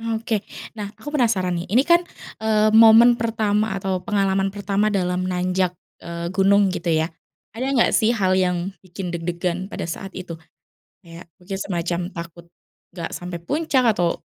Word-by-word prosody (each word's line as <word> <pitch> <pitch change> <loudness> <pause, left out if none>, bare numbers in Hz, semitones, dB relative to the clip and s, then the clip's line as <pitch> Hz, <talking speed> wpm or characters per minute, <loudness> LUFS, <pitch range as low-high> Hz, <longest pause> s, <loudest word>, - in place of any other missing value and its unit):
Oke, 220 -2 -2 0.3
nah, 205 - -3
aku 295 - -8
penasaran 220 -10 +1
nih, 170 - -6
ini 240 +8 +3
kan, 340 +3 +5 0.4
eee, 215 -1 +2
momen 225 +2 +7
pertama 220 -2 0
atau 190 -1 -2
pengalaman 195 0 0
pertama 200 +1 -1
dalam 185 -3 0
nanjak, 180 0 0 0.2
eee, 170 0 -5
gunung 195 +1 +3
gitu 180 -1 -5
ya? 160 0 +1 0.4
Ada 245 +4 -4
nggak 235 - +4
sih 230 +1 +3
hal 190 -4 +1
yang 180 0 0
bikin 180 -1 -7
deg-degan 175 +2 -3
pada - - -6
saat 190 +3 -6
itu? 170 -3 -7 0.7
Kayak 165 0 -12
mungkin 190 +1 -6
semacam 175 -2 -2
takut, 170 -1 -9 0.5
gak 170 -2 -6
sampai 175 -1 -6
puncak 270 - 0
atau 175 -3 0
190 Hz, 155 wpm, -22 LUFS, 175-215 Hz, 0.7 s, momen